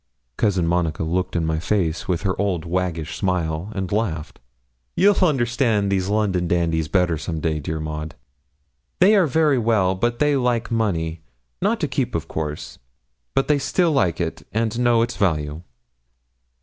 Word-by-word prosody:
Cousin 95 Hz, -, +1 dB
Monica 85 Hz, -2 st, 0 dB
looked 90 Hz, +3 st, -1 dB
in 85 Hz, -1 st, +1 dB
my 80 Hz, 0 st, 0 dB
face 85 Hz, -3 st, -1 dB
with 90 Hz, 0 st, -1 dB
her 95 Hz, -2 st, +1 dB
old 90 Hz, -6 st, -1 dB
waggish 85 Hz, -2 st, -2 dB
smile, 90 Hz, -1 st, -1 dB
and 95 Hz, -3 st, -3 dB
laughed. 95 Hz, -8 st, -2 dB, 0.6 s
'You'll 200 Hz, 0 st, +4 dB
understand 120 Hz, -, +1 dB
those 95 Hz, -1 st, 0 dB
London 100 Hz, -4 st, +1 dB
dandies 85 Hz, -2 st, +1 dB
better 90 Hz, -3 st, +1 dB
some 80 Hz, +1 st, -4 dB
day, 80 Hz, 0 st, -1 dB
dear 80 Hz, +2 st, -4 dB
Maud; 75 Hz, 0 st, -5 dB, 0.8 s
they 190 Hz, +4 st, +6 dB
are 190 Hz, -5 st, +4 dB
very 150 Hz, -2 st, +3 dB
well, 110 Hz, -5 st, +2 dB
but 120 Hz, +5 st, -1 dB
they 150 Hz, +1 st, +2 dB
like 120 Hz, -3 st, 0 dB
money 85 Hz, -8 st, -1 dB, 0.4 s
not -, -, +1 dB
to -, -, +1 dB
keep, -, -, -2 dB
of -, -, -3 dB
course 75 Hz, -1 st, -5 dB, 0.6 s
but 135 Hz, -, +3 dB, 0.2 s
still 175 Hz, +4 st, +2 dB
they -, -, 0 dB
like 90 Hz, -, +1 dB
it 85 Hz, -2 st, -3 dB
and 115 Hz, +1 st, -1 dB
know 120 Hz, -2 st, +4 dB
its 120 Hz, +1 st, -3 dB
value.' 75 Hz, -5 st, 0 dB
95 Hz, 160 wpm, -22 LUFS, 80-115 Hz, 0.8 s, they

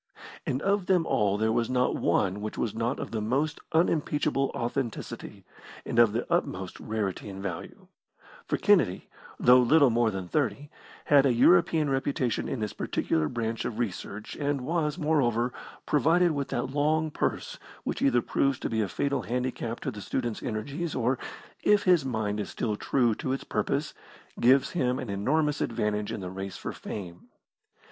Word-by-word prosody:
And 130 Hz, -, -1 dB
of 200 Hz, -1 st, +1 dB
them 180 Hz, -3 st, +3 dB
all 100 Hz, -1 st, +1 dB
there 110 Hz, +1 st, +1 dB
was 115 Hz, 0 st, 0 dB
not 125 Hz, 0 st, +1 dB
one 95 Hz, +2 st, +1 dB
which 105 Hz, 0 st, -5 dB
was 115 Hz, -, -1 dB
not 115 Hz, +3 st, -1 dB
of -, -, -5 dB
the 110 Hz, -, -2 dB
most 135 Hz, +8 st, 0 dB
unimpeachable 150 Hz, -4 st, +1 dB
authenticity, 120 Hz, -1 st, -4 dB, 0.4 s
and 120 Hz, -, 0 dB
of 115 Hz, -3 st, +6 dB
the 115 Hz, +3 st, -2 dB
utmost 95 Hz, -, -2 dB
rarity 105 Hz, -2 st, -3 dB
and 95 Hz, -1 st, -7 dB
value; 90 Hz, -5 st, -6 dB, 0.6 s
for -, -, 0 dB
Kennedy, -, -, +2 dB, 0.3 s
though 125 Hz, +1 st, +7 dB
little 140 Hz, +2 st, +5 dB
more 115 Hz, 0 st, +3 dB
than 95 Hz, -3 st, -5 dB
thirty, 140 Hz, -, -1 dB, 0.3 s
had 140 Hz, -1 st, +5 dB
a -, -, +3 dB
European 160 Hz, +4 st, +4 dB
reputation 135 Hz, -2 st, -1 dB
in 125 Hz, -, -3 dB
this 105 Hz, -, -2 dB
particular 80 Hz, -1 st, 0 dB
branch 115 Hz, +1 st, -2 dB
of 110 Hz, -, -4 dB
research, 105 Hz, -2 st, -4 dB
and 145 Hz, -2 st, -1 dB
was, 150 Hz, +2 st, -1 dB
moreover, 125 Hz, -7 st, +1 dB, 0.3 s
provided 165 Hz, +5 st, +3 dB
with 140 Hz, -2 st, -2 dB
that 120 Hz, +2 st, -2 dB
long 155 Hz, +2 st, +1 dB
purse -, -, -2 dB, 0.2 s
which -, -, -3 dB
either 120 Hz, -4 st, +3 dB
proves 135 Hz, -2 st, +1 dB
to -, -, -4 dB
be 110 Hz, -1 st, +1 dB
a 105 Hz, -, 0 dB
fatal 140 Hz, +10 st, -1 dB
handicap 125 Hz, -1 st, -3 dB
to 135 Hz, -, -2 dB
the 105 Hz, -3 st, -8 dB
student's 120 Hz, +3 st, -3 dB
energies, 145 Hz, +10 st, -3 dB
or, 125 Hz, +1 st, +1 dB, 0.4 s
if 210 Hz, -1 st, +4 dB
his 180 Hz, -5 st, +4 dB
mind 110 Hz, -5 st, -2 dB
is 100 Hz, -, -3 dB
still 105 Hz, -2 st, -2 dB
true 120 Hz, +2 st, +1 dB
to 130 Hz, -, -3 dB
its 135 Hz, -, -3 dB
purpose, -, -, -1 dB, 0.5 s
gives 130 Hz, +3 st, +4 dB
him 125 Hz, -7 st, 0 dB
an 125 Hz, -6 st, -5 dB
enormous 145 Hz, +9 st, +1 dB
advantage 105 Hz, -2 st, -1 dB
in 110 Hz, -, -4 dB
the 90 Hz, -1 st, -5 dB
race 95 Hz, +1 st, -6 dB
for -, -, -5 dB
fame. 90 Hz, -4 st, -8 dB
125 Hz, 170 wpm, -28 LUFS, 110-145 Hz, 0.6 s, though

